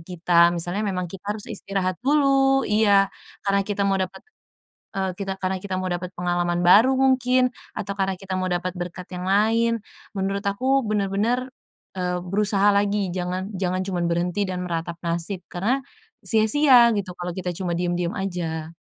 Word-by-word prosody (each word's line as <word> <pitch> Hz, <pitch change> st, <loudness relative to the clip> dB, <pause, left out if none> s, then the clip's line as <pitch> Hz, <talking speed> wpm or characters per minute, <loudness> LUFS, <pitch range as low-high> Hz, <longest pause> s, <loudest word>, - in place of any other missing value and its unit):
kita. 170 Hz, 0 st, +4 dB
Misalnya 180 Hz, +5 st, -1 dB
memang 180 Hz, -2 st, -2 dB
kita 200 Hz, +2 st, -5 dB
harus 210 Hz, -, -5 dB
istirahat 195 Hz, -3 st, -3 dB
dulu 270 Hz, 0 st, +3 dB
iya, 205 Hz, -2 st, +3 dB, 0.3 s
karena 200 Hz, 0 st, +2 dB
kita 205 Hz, -1 st, -1 dB
mau 195 Hz, -1 st, +2 dB
dapet, 185 Hz, -1 st, -4 dB, 0.7 s
eee, 190 Hz, -1 st, -1 dB
kita 195 Hz, -1 st, -3 dB
karena 190 Hz, 0 st, -2 dB
kita 190 Hz, 0 st, -4 dB
mau 185 Hz, 0 st, -2 dB
dapet 175 Hz, +1 st, -3 dB
pengalaman 175 Hz, 0 st, 0 dB
baru 220 Hz, +9 st, +6 dB
mungkin, 255 Hz, -1 st, +3 dB, 0.3 s
atau 200 Hz, -1 st, -4 dB
karena 195 Hz, -1 st, -1 dB
kita 190 Hz, -1 st, -5 dB
mau 185 Hz, -, -1 dB
dapet 180 Hz, +1 st, -1 dB
berkat 175 Hz, +1 st, -6 dB
yang 180 Hz, 0 st, -5 dB
lain. 225 Hz, +4 st, +3 dB, 0.4 s
Menurut 195 Hz, +1 st, -2 dB
aku 260 Hz, +7 st, +2 dB
benar 210 Hz, -2 st, 0 dB
benar, 240 Hz, +6 st, 0 dB, 0.5 s
eee, 180 Hz, -1 st, -1 dB
berusaha 200 Hz, +2 st, +3 dB
lagi, 200 Hz, 0 st, +1 dB
jangan 185 Hz, +2 st, -3 dB
jangan 185 Hz, 0 st, -1 dB
cuman 180 Hz, -3 st, -1 dB
berhenti 175 Hz, +3 st, 0 dB
dan 180 Hz, -1 st, -3 dB
meratap 170 Hz, 0 st, -3 dB
nasib, 170 Hz, +3 st, -1 dB
karena, 215 Hz, +10 st, 0 dB, 0.4 s
sia-sia 235 Hz, +2 st, +5 dB
gitu 195 Hz, -3 st, -3 dB
kalo 175 Hz, -1 st, -4 dB
kita 185 Hz, -1 st, -3 dB
cuma 175 Hz, 0 st, -3 dB
diem-diem 175 Hz, 0 st, -1 dB
aja. 165 Hz, -4 st, -3 dB
195 Hz, 160 wpm, -23 LUFS, 180-210 Hz, 0.7 s, baru